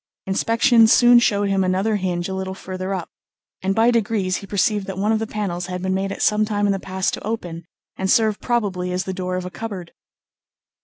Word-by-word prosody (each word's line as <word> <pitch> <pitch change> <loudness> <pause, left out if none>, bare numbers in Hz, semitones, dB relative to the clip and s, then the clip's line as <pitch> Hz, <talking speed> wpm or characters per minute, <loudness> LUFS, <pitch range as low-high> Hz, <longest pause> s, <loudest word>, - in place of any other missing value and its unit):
Inspection 225 +4 +4
soon 240 +2 +6
showed 205 -3 +1
him 195 -1 +2
another 190 +4 +1
hinge 180 -2 -2
a 190 - -4
little 190 0 -4
further 185 0 -6
up, 185 -3 -4 0.5
and 195 +1 0
by 230 +2 +4
degrees 210 -5 0
he 200 - -9
perceived 200 +1 0
that 190 -1 -5
one 205 +3 +1
of 220 - +2
the 225 - -3
panels 185 -5 -3
had 180 0 -5
been 190 0 0
made 195 +1 -1
at - - -3
some 210 0 +3
time 205 -1 0
in 200 - +2
the 195 - -3
past 190 0 -2
to - - -5
open, 175 -7 -5 0.3
and 190 0 -2
serve 220 -1 +2
probably 195 -7 -1
as 180 +1 -1
the 190 - -4
door 185 -1 -3
of 185 0 -3
a 180 - -6
cupboard. 185 -3 -7
195 Hz, 220 wpm, -21 LUFS, 185-215 Hz, 0.5 s, soon